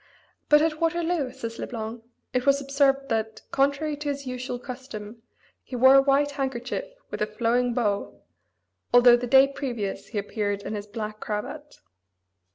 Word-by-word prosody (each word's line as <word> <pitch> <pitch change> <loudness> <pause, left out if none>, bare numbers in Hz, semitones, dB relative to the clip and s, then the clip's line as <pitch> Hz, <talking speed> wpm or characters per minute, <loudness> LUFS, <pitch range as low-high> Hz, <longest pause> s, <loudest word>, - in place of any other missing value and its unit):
"But 295 0 +6
at 315 -1 -1
Waterloo," 330 -3 0
says 230 -2 -7
Le - - -4
Blanc, 225 0 -6 0.3
"it 250 +1 0
was 275 0 +5
observed 275 0 +2
that, 220 -1 -2
contrary 280 +2 +1
to 295 0 -3
his 280 -1 -4
usual 250 -1 -4
custom, 245 -4 -8 0.4
he 255 - -8
wore 260 +2 +7
a 275 - +8
white 280 +1 +2
handkerchief 270 - -3 0.3
with - - -5
a 210 - +2
flowing 235 +2 0
bow, 205 -5 -1 0.7
although 245 0 +8
the 245 +1 -3
day 270 +2 +7
previous 240 -8 -4
he 220 - -6
appeared 205 0 -2
in - - -4
his 205 -1 -5
black 215 0 -6
cravat." 285 +8 -6
250 Hz, 165 wpm, -26 LUFS, 225-280 Hz, 0.7 s, a